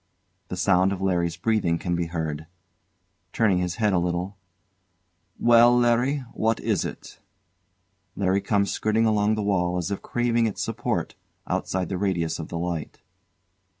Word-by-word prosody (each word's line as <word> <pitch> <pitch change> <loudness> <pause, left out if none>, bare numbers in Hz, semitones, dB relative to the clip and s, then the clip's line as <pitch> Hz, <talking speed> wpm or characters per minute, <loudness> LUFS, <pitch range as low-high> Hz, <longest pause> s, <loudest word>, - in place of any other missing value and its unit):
] - - -46
The - - -5
sound 95 0 +3
of 100 - -3
LARRY's 85 -3 0
breathing 95 -4 +1
can 85 0 -2
be 85 -1 -1
heard. 80 -2 -4 0.9
[Turning 105 -6 +2
his 90 -1 -2
head 105 -3 +1
a 90 - +3
little] 90 +3 -2 1.0
Well, 120 +1 +6
Larry, 125 +4 +2
what 110 +1 0
is - - 0
it? - - -8 1.0
LARRY 100 0 +1
comes 100 0 +1
skirting 110 +1 +1
along 105 -1 +2
the 105 - -2
wall, 90 -3 0
as 90 +2 -3
if 100 - -3
craving 120 -1 +1
its 105 - -3
support, - - -2 0.3
outside 95 -2 -2
the 95 - -3
radius 85 -5 -1
of 80 - -5
the 85 - -5
light. 85 -2 -4
95 Hz, 155 wpm, -25 LUFS, 85-110 Hz, 1.0 s, Well